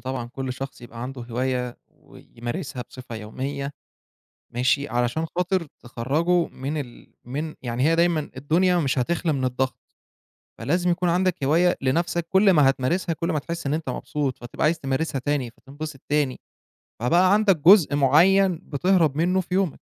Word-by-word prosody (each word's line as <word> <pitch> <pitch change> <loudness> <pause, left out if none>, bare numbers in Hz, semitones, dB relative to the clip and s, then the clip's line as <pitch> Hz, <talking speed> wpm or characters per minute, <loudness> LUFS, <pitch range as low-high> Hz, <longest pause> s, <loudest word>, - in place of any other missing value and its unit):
طبعًا 130 -2 -4
كل 130 +1 -4
شخص 135 +1 -7
يبقى 120 -1 -9
عنده 130 0 -6
هواية 125 +1 -2
ويمارسها 125 +2 -7
بصفة 125 -2 -9
يومية 140 +6 -5 0.8
ماشي، 130 +4 +1
علشان 120 +7 0
خاطر 180 -1 0
تخرجه 155 +9 0
من 140 +4 -5
ال 125 -4 -11
من 150 +6 -4
يعني 120 0 -2
هي 165 +2 +3
دايمًا 170 -3 +1
الدنيا 170 +7 +2
مش 135 -5 0
هتخلى 165 +5 0
من 135 -3 -1
الضغط، 130 +1 -1 0.8
فلازم 175 +9 0
يكون 175 0 0
عندك 180 -2 +1
هواية 170 +6 +3
لنَفْسك، 170 +5 0
كل 195 +1 +5
ما 145 -5 +5
هتمارسها، 165 +7 0
كل 165 +1 -3
ما 155 - 0
هتحس 170 +3 -5
إن 140 - 0
أنت 160 +1 -3
مبسوط، 145 -4 -3
فتبقى 120 - -5
عايز 160 +2 +2
تمارسها 135 0 -1
تاني، 135 -3 -1
فتنبسط 140 +3 -9
تاني، 145 -3 +1 0.6
فبقى 175 - +4
عندك 205 -4 +4
جزء 165 -2 +6
معيّن 170 +6 +4
بتهرب 160 -1 +1
مِنّه 180 +3 +2
في 180 0 -8
يومك، 190 -5 0
145 Hz, 155 wpm, -24 LUFS, 130-170 Hz, 0.8 s, جزء